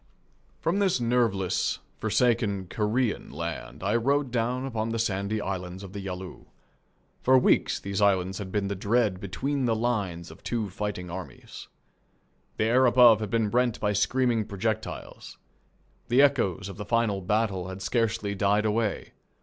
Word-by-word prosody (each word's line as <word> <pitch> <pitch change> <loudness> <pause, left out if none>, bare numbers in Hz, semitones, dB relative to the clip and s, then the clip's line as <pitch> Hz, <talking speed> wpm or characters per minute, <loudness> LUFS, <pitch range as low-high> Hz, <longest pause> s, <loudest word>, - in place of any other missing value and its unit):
From 175 +5 +1
this 190 -8 +2
nerveless, 115 -6 +1 0.2
forsaken 110 -6 +1
Korean 110 +3 -1
land - - -6
I 100 +4 +1
rode 135 +3 +1
down 125 +2 -1
upon 115 -4 -2
the 115 - -2
sandy 105 -1 -1
islands 95 -1 -5
of 95 -1 -10
the 100 - -5
Yalu. 95 -1 -7 0.7
For 130 +1 +5
weeks 125 - +3
these 100 0 -3
islands 95 -2 +2
had 95 -2 -6
been 100 -1 0
the 100 - -2
dread 100 0 +1
between 130 +9 -2
the 115 -2 +2
lines 100 -8 -2
of 80 - -14
two 110 -5 -2
fighting 95 -3 -4
armies. 85 -8 -9 0.9
The - - +1
air 125 +3 +4
above 120 -3 +7
had 110 -2 -4
been 110 -1 0
rent 125 -2 +1
by 105 -1 0
screaming 120 +1 +1
projectiles. 110 +2 -4 0.7
The 125 +4 +5
echoes 100 - +1
of 100 - -8
the 105 - -5
final 110 -3 +1
battle 100 -2 0
had 95 0 -7
scarcely 115 -3 0
died 100 +2 +2
away. 110 -1 -1
105 Hz, 155 wpm, -27 LUFS, 95-120 Hz, 0.9 s, above